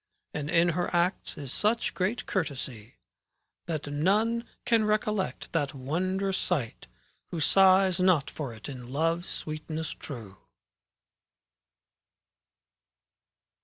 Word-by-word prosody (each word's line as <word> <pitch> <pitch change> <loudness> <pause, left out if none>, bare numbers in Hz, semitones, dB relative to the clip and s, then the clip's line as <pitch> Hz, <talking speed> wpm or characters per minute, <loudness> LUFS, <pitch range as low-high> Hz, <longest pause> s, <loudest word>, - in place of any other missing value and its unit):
And 150 0 -3
in 170 +1 +4
her 175 +1 0
acts 175 +3 0
is 140 -4 -5
such 220 +2 +1
great 195 +6 -1
courtesy, 130 - -3 0.7
That 155 -3 -2
none 205 +11 +1 0.2
can 230 -2 +4
recollect 215 -2 -1
that 145 -3 0
wondrous 185 +8 -1
sight, 140 -11 -1 0.4
Who 170 - -4
sighs 190 +2 +5
not 180 -6 +4
for 140 -5 -5
it 110 -1 -9
in 125 -3 -8
Love's 165 +5 0
sweetness 155 0 -4
true. 110 -9 -8
165 Hz, 105 wpm, -29 LUFS, 145-190 Hz, 0.7 s, sighs